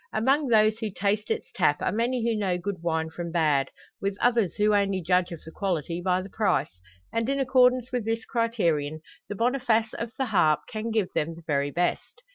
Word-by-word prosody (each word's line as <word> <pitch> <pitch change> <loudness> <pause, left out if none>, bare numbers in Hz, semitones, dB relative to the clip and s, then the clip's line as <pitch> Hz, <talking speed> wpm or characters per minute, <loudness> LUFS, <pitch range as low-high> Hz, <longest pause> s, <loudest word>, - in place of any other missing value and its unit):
Among 270 +6 +2
those 215 -1 +4
who 220 -2 -2
taste 205 +2 -1
its - - -3
tap 150 -6 +2
are - - 0
many 235 +4 0
who 230 - +1
know 190 -4 0
good 185 -1 -5
wine 160 -1 -1
from 170 0 -5
bad, 150 -5 +2 0.3
with 195 0 -2
others 235 -6 +2
who 210 0 +2
only 200 -2 +2
judge 180 +1 +1
of 170 - -8
the 160 - -10
quality 175 -2 -2
by 185 0 +1
the 195 - -9
price; 195 - 0 0.3
and 230 +2 0
in 275 0 0
accordance 255 -1 +3
with 250 -3 -1
this 225 +1 -2
criterion 170 - 0 0.3
the 205 - -4
Boniface 230 -1 +1
of 230 0 -5
the 265 - 0
"Harp" 170 -9 +3
can 220 +1 -4
give 220 -4 -1
them 165 +2 -1
the 170 - -13
very 140 -2 0
best. 180 - -2
205 Hz, 205 wpm, -26 LUFS, 170-230 Hz, 0.3 s, those